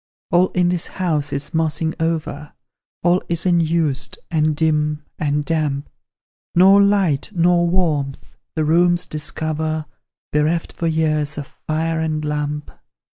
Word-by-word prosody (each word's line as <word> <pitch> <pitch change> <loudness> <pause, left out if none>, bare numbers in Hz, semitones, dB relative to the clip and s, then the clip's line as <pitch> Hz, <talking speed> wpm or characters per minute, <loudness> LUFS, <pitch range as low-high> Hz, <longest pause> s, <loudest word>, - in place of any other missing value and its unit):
All 180 +1 +5
in 180 -1 +2
this 175 -2 -1
house 155 -6 -1
is 140 0 -4
mossing 160 0 0
over; 155 -3 -2 0.5
All 175 +1 +3
is 170 0 0
unused, 165 -5 +1
and 155 -1 +2
dim, 150 -1 0
and 145 -1 0
damp; 150 -3 -1 0.6
Nor 195 +3 +7
light, 195 -8 +2
nor 175 -1 +3
warmth, 155 -6 -1 0.2
the 155 -1 +1
rooms 175 +2 +3
discover 155 +1 -3 0.5
Bereft 155 +3 +1
for 170 - -2
years 155 -2 0
of 145 - -4
fire 160 +3 -2
and 155 -1 -1
lamp. 150 0 -3
160 Hz, 125 wpm, -20 LUFS, 150-170 Hz, 0.6 s, Nor